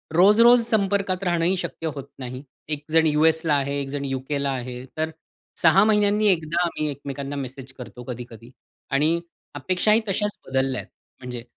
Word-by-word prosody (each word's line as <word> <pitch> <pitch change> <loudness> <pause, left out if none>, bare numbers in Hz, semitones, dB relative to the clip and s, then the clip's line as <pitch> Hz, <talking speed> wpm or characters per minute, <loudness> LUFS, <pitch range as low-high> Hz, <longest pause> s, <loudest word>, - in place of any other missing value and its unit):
रोज-रोज 230 +7 +6
संपर्कात 200 -3 +1
राहणंही 175 +1 +1
शक्य 170 -2 -4
होत 140 -1 -7
नाही. 130 +1 -6 0.3
एक 150 -1 -3
जण 160 0 +4
यू-एसला 160 +1 +3
आहे, 140 0 0
एक 140 - -5
जण 140 0 -3
यु-केला 140 +1 -2
आहे. 125 -1 -5
तर 160 0 0 0.5
6 170 +4 +6
महिन्यांनी 210 0 +3
एकदा 165 -1 0
आम्ही 155 -3 -2
एकमेकांना 140 0 -6
मेसेज 135 -1 -7
करतो 125 -1 -9
कधी-कधी. 120 -1 -8 0.4
आणि 155 +5 +2 0.4
अपेक्षाही 185 - +2
तश्याच 205 +2 -1
बदलल्या 130 -1 0
आहेत. - - -17 0.3
म्हणजे 125 -2 -7
150 Hz, 150 wpm, -24 LUFS, 135-185 Hz, 0.5 s, रोज-रोज